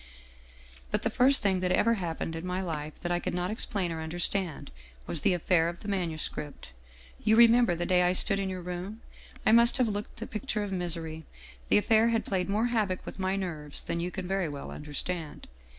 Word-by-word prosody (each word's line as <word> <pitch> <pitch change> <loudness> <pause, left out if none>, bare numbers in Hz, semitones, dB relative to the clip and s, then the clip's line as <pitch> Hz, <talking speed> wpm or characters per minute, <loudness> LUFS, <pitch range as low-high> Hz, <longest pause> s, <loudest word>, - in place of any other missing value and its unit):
" 60 +1 -22
But - - 0
the 225 - 0
first 260 +3 +4
thing 190 -2 +2
that 180 0 0
ever 230 +5 +3
happened 165 -5 -3
in 165 - -5
my 180 0 -2
life 155 -4 -5
that 175 - -3
I 175 - +1
could - - -3
not 180 +2 -1
explain 200 -5 -2
or 160 -1 -4
understand 175 - -2 0.3
was 155 - -1
the 195 -3 +3
affair 170 -1 +2
of 175 - -8
the - - -8
manuscript. 160 - -3 0.5
You 220 - +4
remember 235 -4 +6
the 175 +1 -2
day 180 -1 +3
I 180 0 +3
stood 195 +2 +3
in 195 -1 -2
your 185 -1 -5
room? 180 +5 -6 0.4
I - - +5
must 235 +2 +6
have 250 -3 +2
looked 205 0 -4
the 225 - -5
picture 215 -1 -3
of 205 - -5
misery. 165 -3 -3 0.4
The - - +5
affair 220 +2 +4
had 230 -1 0
played 185 -1 -1
more 215 +3 +1
havoc 215 -6 -1
with - - -8
my 190 0 0
nerves 160 -7 -2
than 170 - -3
you 175 +1 -2
can 185 -1 -6
very 190 -3 -1
well 140 -1 -7
understand. 150 +2 -4
180 Hz, 215 wpm, -29 LUFS, 165-205 Hz, 0.5 s, remember